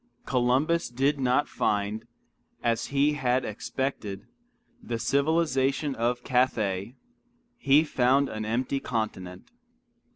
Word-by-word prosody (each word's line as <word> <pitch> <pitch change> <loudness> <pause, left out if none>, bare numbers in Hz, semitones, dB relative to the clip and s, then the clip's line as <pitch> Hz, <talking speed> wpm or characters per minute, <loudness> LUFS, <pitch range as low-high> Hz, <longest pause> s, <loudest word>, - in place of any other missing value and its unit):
Columbus 135 +7 +1
did 135 +4 0
not 130 +3 +2
find, 105 +1 -1 0.6
as 115 -1 0
he 140 +2 +2
had 130 -2 0
expected, 110 -2 -4 0.6
the 115 - -4
civilization 140 0 +1
of 120 +1 -1
Cathay; 110 -4 0 0.6
he 140 +2 +5
found 135 -1 +2
an 110 -3 -5
empty 125 +5 -1
continent. 95 -7 -4
125 Hz, 100 wpm, -27 LUFS, 115-140 Hz, 0.6 s, he